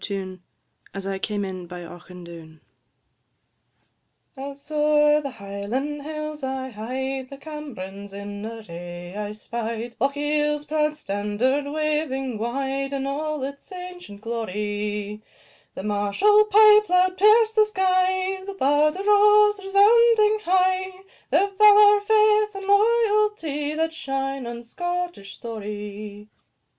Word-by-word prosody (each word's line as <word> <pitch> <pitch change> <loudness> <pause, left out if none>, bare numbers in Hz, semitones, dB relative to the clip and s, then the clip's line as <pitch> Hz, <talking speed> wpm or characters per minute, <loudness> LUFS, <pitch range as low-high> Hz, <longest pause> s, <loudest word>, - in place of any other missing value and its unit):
TUNE 190 -2 -5 0.5
"As 195 -1 -6
I 195 0 -3
came 205 0 -2
in 185 -2 -7
by 175 0 -8
Auchindoun." 170 -2 -12 1.8
I. 265 - -10
As 280 +2 -12
o'er 300 0 +3
the 280 - -4
Highland 230 +7 -5
hills 305 0 -6
I 265 0 -3
hied, 260 +4 -4
The 275 - -10
Camerons 220 -11 -8
in 205 +1 -7
array 175 -5 -8
I 210 0 -4
spied; 230 +2 -5
Lochiel's 295 +2 0
proud 305 0 0
standard 210 +4 -1
waving 300 -6 -2
wide, 270 +4 -2
In 270 -1 -2
all 300 +1 -3
its 280 +6 -7
ancient 360 - -9
glory. 210 -1 -4 0.5
The - - -6
martial 210 - +3
pipe 425 0 +6
loud 365 +1 +3
pierced 430 +3 +5
the 430 -1 +5
sky, 375 -1 0
The 395 0 -7
bard 295 0 +2
arose, 415 +1 +4
resounding 430 +2 +4
high 375 +1 +1 0.3
Their 400 - +3
valour, 415 +1 +7
faith, 425 0 +3
and 390 0 -6
loyalty, 415 -8 +1
That 320 +1 -1
shine 270 -3 -3
in 235 0 -7
Scottish 350 - -5
story. 210 -2 -7
280 Hz, 120 wpm, -23 LUFS, -, 1.8 s, valour